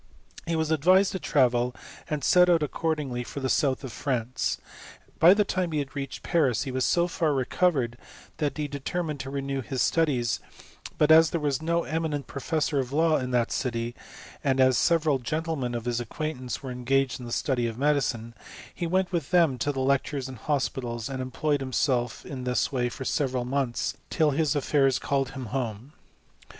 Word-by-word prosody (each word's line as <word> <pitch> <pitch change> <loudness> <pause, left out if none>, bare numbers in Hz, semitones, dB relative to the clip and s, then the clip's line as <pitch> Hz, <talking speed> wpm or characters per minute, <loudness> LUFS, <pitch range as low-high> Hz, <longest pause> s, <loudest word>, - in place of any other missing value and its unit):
He 165 - 0
was 160 -1 0
advised 185 +6 +4
to 190 - -3
travel, 125 -5 +2 0.3
and 150 -3 -2
set 180 +4 +5
out 165 -3 +4
accordingly 150 -4 -2
for 140 - -7
the 130 -1 -2
South 135 -2 +1
of 130 - -6
France: 125 -3 -1 0.6
by 175 +4 +8
the 210 0 +3
time 185 -4 -1
he 145 -2 0
reached 135 -2 -5
Paris 145 -9 +2
he 135 - -4
was 130 0 0
so 175 0 +2
far 160 -4 0
recovered 130 -3 +1 0.4
that 150 -2 -1
he 150 -1 -1
determined 150 +2 -3
to 135 - -5
renew 135 0 -3
his 130 +2 -1
studies; 130 -9 +1 0.6
but 150 0 +4
as 160 0 +8
there 170 - -1
was 145 -3 -1
no 170 +1 +1
eminent 155 -3 -2
professor 145 +2 -1
of 130 -1 -2
law 160 +2 +3
in 125 -1 -3
that 120 -2 +1
city, 115 -2 -2 0.5
and 135 -1 +1
as 130 -1 +5
several 155 -4 +2
gentlemen 145 -2 -2
of 120 -1 -4
his 120 -1 0
acquaintance 130 +1 -4
were 130 - -5
engaged 130 +2 0
in 125 - -8
the - - -7
study 120 -1 0
of 115 -1 -5
medicine, 125 -5 0 0.4
he 170 - -3
went 185 +2 +1
with 165 -6 -2
them 165 -8 +3
to 145 - 0
the 135 -2 -3
lectures 135 0 0
and 130 -3 -9
hospitals, 125 -4 -2
and 130 -1 -4
employed 140 +3 -1
him 130 -1 -4
self 125 -3 0
in 130 -3 -6
this 125 +2 0
way 125 -3 0
for 130 - -7
several 130 -4 0
months, 130 -2 -1
till 155 -3 +2
his 150 0 +1
afiaurs 135 -2 +2
called 135 -2 0
him 130 -2 -6
home. 125 +1 -3
135 Hz, 185 wpm, -27 LUFS, 125-155 Hz, 0.6 s, by